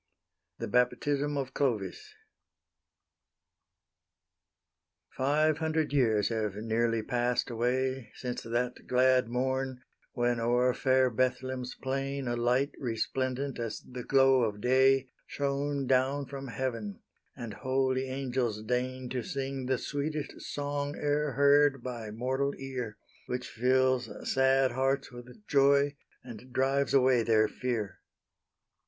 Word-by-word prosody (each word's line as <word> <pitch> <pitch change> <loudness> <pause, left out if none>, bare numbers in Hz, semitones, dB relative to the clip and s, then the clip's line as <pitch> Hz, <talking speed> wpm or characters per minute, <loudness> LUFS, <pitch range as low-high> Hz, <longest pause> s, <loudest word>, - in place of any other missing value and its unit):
THE 115 - -4
BAPTISM 140 +5 +1
OF 130 -1 -3
CLOVIS 110 -10 -2 3.0
Five 150 +3 +2
hundred 160 -2 0
years 110 -7 +3
have 110 -3 -2
nearly 115 +1 0
passed 120 +1 0
away 130 +2 -1
Since 125 -1 -4
that 120 +2 -3
glad 130 -1 +4
morn, 130 +1 -2 0.3
when 120 -1 +1
o'er 120 +2 +2
fair 130 -1 +3
Bethl'hem's 130 +1 -1
plain 135 0 -3
A 120 - 0
light 125 +4 +1
resplendent 130 +2 -2
as 115 -2 -3
the 125 -1 -8
glow 135 0 +4
of 105 -3 -1
day, 130 +2 +3 0.2
Shone 140 0 -1
down 135 +2 +2
from 135 +1 -7
heaven, 115 -6 -4 0.3
and 115 -3 -6
holy 130 +1 0
angels 125 -5 -2
deign 125 +2 -2
To 125 0 -2
sing 135 0 -4
the 130 -1 +1
sweetest 145 +3 -3
song 145 0 -3
e'er 145 -1 0
heard 140 -1 +4
by 120 -4 -5
mortal 130 +5 -1
ear, 125 -5 -5 0.3
Which 125 0 -3
fills 130 0 +2 0.2
sad 135 0 +3
hearts 135 +2 0
with 125 - -12
joy 140 -1 +4 0.3
and 125 +1 -11
drives 135 +2 +1
away 130 -2 +5
their 110 -1 +3
fear. 115 -6 -3
130 Hz, 120 wpm, -30 LUFS, 120-135 Hz, 3.0 s, away